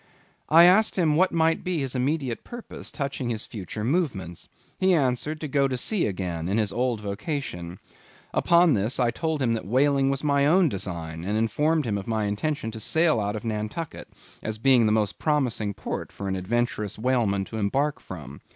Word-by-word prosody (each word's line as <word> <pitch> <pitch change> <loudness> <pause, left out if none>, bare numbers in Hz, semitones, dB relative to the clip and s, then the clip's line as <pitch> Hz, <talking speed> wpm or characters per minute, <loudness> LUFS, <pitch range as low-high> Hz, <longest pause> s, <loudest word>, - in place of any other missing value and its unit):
I 165 +2 +8
asked 195 +5 +5
him 160 -5 +2
what 185 +4 +3
might 165 0 +2
be 180 -1 -1
his 135 -4 -2
immediate 130 -1 -1
purpose, 240 -1 -8
touching 140 -3 -3
his 110 -3 -3
future 105 0 -6
movements. 115 - -2 0.3
He 185 -1 +4
answered, 145 +2 0
to 155 - -3
go 140 -1 +2
to 130 -1 -2
sea 195 - +1
again, 90 -4 -3
in 100 - +1
his 105 -2 0
old 120 -3 0
vocation. 100 - -4 0.6
Upon 170 -2 +4
this, 110 +5 0
I 120 -2 +3
told 160 -2 -2
him 115 -2 +2
that 110 -5 -4
whaling 135 +3 +3
was 135 +1 -1
my 140 -1 +3
own 175 +1 +4
design, 85 -5 -4
and 105 +4 -1
informed 150 +8 +1
him 105 -3 -1
of 95 - -9
my 110 -2 0
intention 115 +5 -2
to 110 - -7
sail 160 +4 +2
out 105 0 -2
of 105 - -5
Nantucket, 110 +9 -4 0.3
as 110 -1 -4
being 125 -1 +4
the - - +2
most 105 -3 0
promising 125 -9 0
port - - -5
for 100 - -6
an 95 - -1
adventurous 105 +1 -1
whaleman 110 -5 +1
to 110 - -7
embark 135 +8 0
from. 75 -6 -9
120 Hz, 190 wpm, -25 LUFS, 105-150 Hz, 0.6 s, I